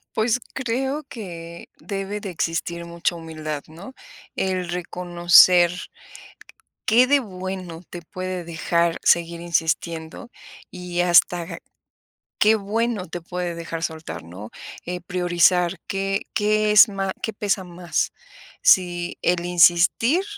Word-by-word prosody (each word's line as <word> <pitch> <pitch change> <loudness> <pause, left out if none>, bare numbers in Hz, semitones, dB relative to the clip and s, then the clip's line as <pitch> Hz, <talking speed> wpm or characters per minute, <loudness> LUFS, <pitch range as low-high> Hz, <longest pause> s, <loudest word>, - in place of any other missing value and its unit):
Pues, 225 +2 +1 0.2
creo 265 +4 -2
que 170 - -9
debe 200 +1 -5
de 200 -3 -6
existir 170 +1 -3
mucha 170 +1 -2
humildad, 155 -3 -6
¿no?, 175 +11 -11 0.4
el 185 -2 -1
reconocer, 175 0 +4 1.1
¿qué 240 +4 +5
de 285 +1 +4
bueno 185 -4 -7
te 175 - -9
puede 185 +1 -5
dejar 170 0 0
seguir 170 0 +2
insistiendo, 165 +2 -2 0.4
y 180 -1 -4
hasta 175 0 +4
ga - - -7 0.8
qué 220 +1 +5
bueno 215 -1 -2
te 175 - -5
puede 175 0 -4
dejar 165 0 -6
soltar?, 160 - -5
¿no?, 95 +6 -10 0.4
eh, 180 0 -5
priorizar 175 0 +2
qué 195 0 -1
qué 215 0 +2
es 210 +3 +8
má 195 -1 -3
qué 220 - -3
pesa 200 -2 -1
más, 175 -1 -2 0.5
si 175 - +3
el 175 0 +1
insistir 180 - +4
180 Hz, 120 wpm, -22 LUFS, 170-200 Hz, 1.1 s, es